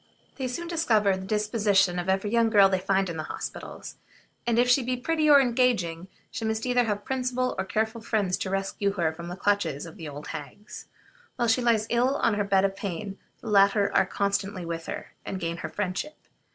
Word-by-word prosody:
They 265 -2 -2
soon 340 +8 -5
discover 235 - +2
the 190 - -1
antecedents - - -7
and 190 - -9
disposition 205 -4 +2
of 175 +2 -3
every 195 +2 0
young 230 -1 +3
girl 200 -3 +6
they 190 -1 +1
find 195 +1 +1
in 165 -2 -5
hospitals; 155 - -7 0.5
and 235 -1 +2
if 245 +1 +4
she 250 +2 +5
be 250 +1 -2
pretty 310 +4 +1
or 285 -1 +9
engaging, 235 -10 +1 0.2
she 225 - -5
must 220 +1 -1
either 245 -1 +2
have 210 -2 0
much 205 - -22
principle 255 -1 -1
or - - -1
careful 220 +4 -1
friends 205 -5 0
to 190 - -3
rescue 195 +1 -1
her 165 -5 0
from 170 +1 -8
the 175 - -5
clutches 185 -8 0
of 165 - -11
the 160 -5 -7
old 145 +1 -8
hags. 175 +8 -9 0.5
While 240 -2 0
she 225 +3 +3
lies 230 -3 +2
ill 250 +3 +2
on 230 - +2
a - - +2
bed 195 -1 +3
of 195 0 -1
pain, 195 0 -5 0.2
the 230 - -6
latter 200 0 +4
are - - +4
constantly 200 -2 -2
with 165 0 -5
her, - - -6
and 190 - -5
gain 170 -1 -3
her - - -5
friendship. 205 +10 -3
205 Hz, 220 wpm, -26 LUFS, 190-235 Hz, 0.5 s, or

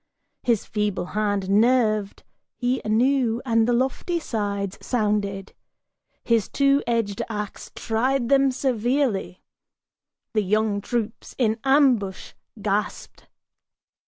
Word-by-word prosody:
His 235 -4 +1
feeble 210 -4 -2
hand 205 -2 0
nerved 215 -1 +2 0.3
he 250 +1 -1
anew, 235 +1 +2
and 230 -2 +2
the - - +2
lofty 265 +8 0
sides 200 - -3
sounded, 205 -4 -1 0.7
His 230 -4 +1
two 275 0 +3
edged 225 -4 0
ax 210 -2 -5
tried 240 +3 0
them 275 +1 +4
severely. 245 -6 -1 0.9
The 215 - +2
young 210 +1 0
troops 230 0 -4
in 225 -3 +1
ambush 260 -9 +2 0.3
Gasped. 205 0 -3
225 Hz, 100 wpm, -24 LUFS, 205-255 Hz, 0.9 s, them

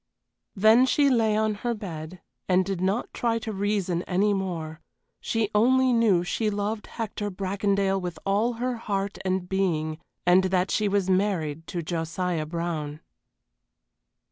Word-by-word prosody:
Then 220 +5 +6
she 280 +1 +3
lay 220 -3 +3
on 215 0 +1
her 240 -1 -1
bed 175 -4 -7 0.3
and 185 0 +4
did 195 -2 -3
not 195 +6 -1
try 230 -1 0
to 220 -1 -5
reason 195 -3 0
any 200 +3 +2
more; 165 -5 -4 0.4
she 225 -2 -1
only 255 +4 +4
knew 215 -7 +3
she 215 +5 -1
loved 210 +1 -3
Hector 215 -2 -4
Bracondale 195 0 0
with 175 -2 -5
all 210 +5 +2
her 245 +1 -2
heart 200 -3 -3
and 185 -1 -1
being, 165 -5 -1 0.3
and 180 +2 +5
that 185 0 +1
she 215 - +1
was 200 -2 +1
married 180 -5 0
to 175 -2 -4
Josiah 165 0 -2
Brown. 155 -2 -4
195 Hz, 145 wpm, -26 LUFS, 175-215 Hz, 0.4 s, Then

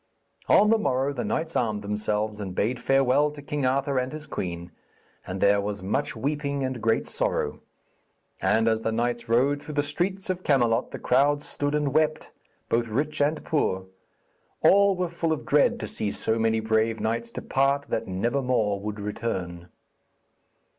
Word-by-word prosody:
On 210 +1 +6
the 225 - +4
morrow 135 -6 0
the 125 - -3
knights 160 0 -2
armed 110 -3 0
themselves, 105 +1 -2
and 95 -3 -5
bade 120 +6 0
farewell 135 +3 +3
to 150 0 -10
King 145 -1 -2
Arthur 135 +1 +1
and 130 +1 -2
his 155 0 -7
queen, 85 - -5 0.6
and 95 +1 -4
there 100 +1 +4
was 100 -1 -4
much 125 +10 -1
weeping 140 +2 -2
and 130 -3 -3
great 110 0 +1
sorrow. - - -1 0.8
And 110 0 +2
as 110 0 +2
the 115 - -1
knights 120 +1 -2
rode 135 +5 +2
through 150 -1 -8
the 145 - +2
streets 185 +6 -2
of 185 0 -4
Camelot 120 -8 +2
the - - -6
crowds 145 +3 +2
stood 145 +1 -2
and 145 -2 0
wept, 155 0 +1 0.4
both 115 0 +1
rich 145 +7 -1
and 150 +2 0
poor. 95 -11 0 0.8
All 200 0 +6
were 180 0 -1
full 170 -1 -2
of 155 - -2
dread 145 0 +3
to 105 - -3
see 105 - -3
so 110 +2 -1
many 110 0 +2
brave 110 0 +1
knights 115 +1 -2
depart 140 +4 0
that - - -2
never 115 +9 0
more 110 -6 +1
would 105 +1 -5
return. 95 -5 -4
125 Hz, 175 wpm, -26 LUFS, 110-145 Hz, 0.8 s, On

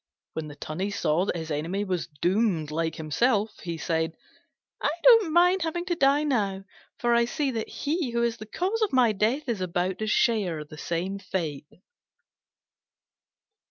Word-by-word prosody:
When 160 -1 -4
the 145 - -9
Tunny 155 +7 -4
saw 175 -3 +1
that - - -1
his 160 -1 -5
enemy 165 +7 -1
was 185 -4 -2
doomed 175 0 0
like 160 +1 -1
himself, 210 - 0
he 170 -2 -4
said, 160 -1 -1 0.7
"I - - +2
don't 455 -9 +7
mind 355 +3 +4
having 335 +2 -2
to 355 -2 0
die 280 0 +3
now: 200 -9 0 0.3
for 240 0 +1
I 235 0 +4
see 290 +2 -1
that 225 -3 -3
he 305 -1 -2
who 235 0 0
is 235 -1 0
the 215 -1 -9
cause 385 - -1
of 430 - +2
my 250 -4 +4
death 230 +8 0
is 225 -6 -2
about 180 +1 -1
to 215 - -2
share 195 -9 +1
the 150 - -12
same 175 +5 -3
fate." 160 -7 -4
205 Hz, 170 wpm, -27 LUFS, 165-260 Hz, 0.7 s, don't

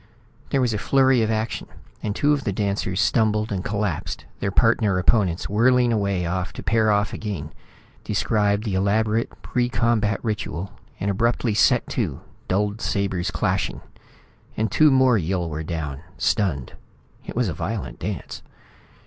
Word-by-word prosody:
There 135 - +1
was 120 -3 +1
a 105 - -1
flurry 130 +2 +3
of 110 - +1
action, 110 0 -2 0.3
and 105 -1 -2
two 150 +2 +3
of 145 -2 -1
the 105 - -1
dancers 100 -1 -1
stumbled 110 +4 +2
and 95 -2 -2
collapsed, 100 -6 -3
their 100 - -1
partner 105 -1 +3
opponents 90 -2 +2
whirling 120 +3 +3
away 100 -4 0
to 90 +3 -3
pair 110 +4 +2
off 105 0 +1
again, 90 -9 -5 0.5
describe 105 -1 +1
the 105 -4 -2
elaborate 105 +4 +1
pre 120 -1 0
combat 115 -5 +1
ritual, 100 -4 -3 0.3
and 100 +2 0
abruptly 115 +2 +1
set 105 - +3
to, - - -2 0.3
dulled 105 +3 0
sabres 95 -4 -1
clashing - - -1 0.8
and 110 -2 0
two 155 +6 +5
more 130 -4 +4
Yill 90 0 -1
were 80 -1 -4
down, 75 -4 -4 0.2
stunned. 75 - 0 0.5
It - - -6
was 120 -1 +1
a 90 - -2
violent 95 - -4
dance. - - -5
105 Hz, 150 wpm, -23 LUFS, 95-115 Hz, 0.8 s, two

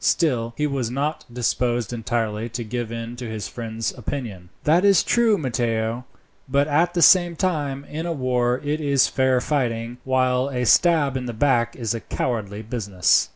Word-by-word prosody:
Still, 120 -7 +1
he 150 - +1
was 135 -5 -1
not 145 +5 -2
disposed 120 -1 -1
entirely 115 -1 -2
to 120 +1 -4
give 115 0 -4
in 115 +1 -5
to 120 -2 -6
his 110 -2 -5
friend's 115 -1 -4
opinion. 110 -8 -6
"That 165 +5 +3
is 200 -3 +5
true, 230 -3 +3
Matteo; 120 - -1 0.4
but 140 +2 +2
at 165 +4 +1
the 170 - +4
same 175 -2 +6
time, 145 -6 -2
in 160 +4 -5
a - - -1
war 125 -4 0
it 150 +2 -1
is 140 -3 +3
fair 130 -1 +2
fighting, 120 -4 -2
while 130 0 +1
a 125 -2 -2
stab 150 0 +4
in 125 -1 -3
the 120 - -4
back 120 -1 +1
is 115 -3 -2
a 115 - -3
cowardly 110 -3 -3
business." 105 -5 +1
125 Hz, 175 wpm, -23 LUFS, 115-145 Hz, 0.4 s, same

